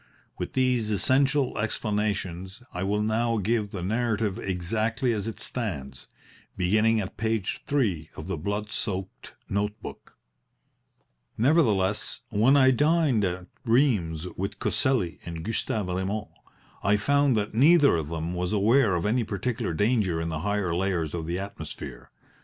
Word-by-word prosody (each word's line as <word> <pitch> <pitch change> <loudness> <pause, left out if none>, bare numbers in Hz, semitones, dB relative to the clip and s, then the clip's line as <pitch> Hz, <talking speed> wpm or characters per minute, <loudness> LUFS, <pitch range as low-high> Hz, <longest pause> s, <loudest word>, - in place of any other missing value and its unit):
With - - -4
these 125 -4 +1
essential 135 +5 +2
explanations 105 -2 -2
I 90 - -4
will 105 +2 0
now 115 +2 +1
give 105 +1 0
the 95 -3 -5
narrative 110 0 0
exactly 110 +6 -1
as 105 -1 -3
it 115 - -5
stands, 70 - -5 0.5
beginning 110 +5 +3
at 95 -3 -5
page 110 -2 -1
three 105 - 0
of 75 - -7
the 95 - -2
blood 100 +6 -3
soaked 95 -2 -4
note 105 +1 -1
book: - - -10 1.2
"Nevertheless, 110 - +2
when 115 +7 +4
I 130 -1 +6
dined 145 -4 +3
at 90 -1 -2 0.2
Rheims 110 - +2
with 100 +2 -4
Coselli 120 -11 0
and 85 -1 -6
Gustav 110 -2 -1
Raymond 95 +3 -2 0.5
I 100 +2 +3
found 140 +2 +3
that 105 0 -2
neither 145 - +6
of 80 -3 -3
them 85 +1 -3
was 90 +2 -2
aware 110 0 +4
of 85 - -1
any 115 +3 +2
particular 105 -3 -2
danger 105 -4 +1
in 80 0 -2
the 80 -1 -3
higher 100 0 -1
layers 85 -3 -1
of 80 -2 -4
the 85 +1 -1
atmosphere. 100 +1 -7
105 Hz, 145 wpm, -26 LUFS, 90-115 Hz, 1.2 s, I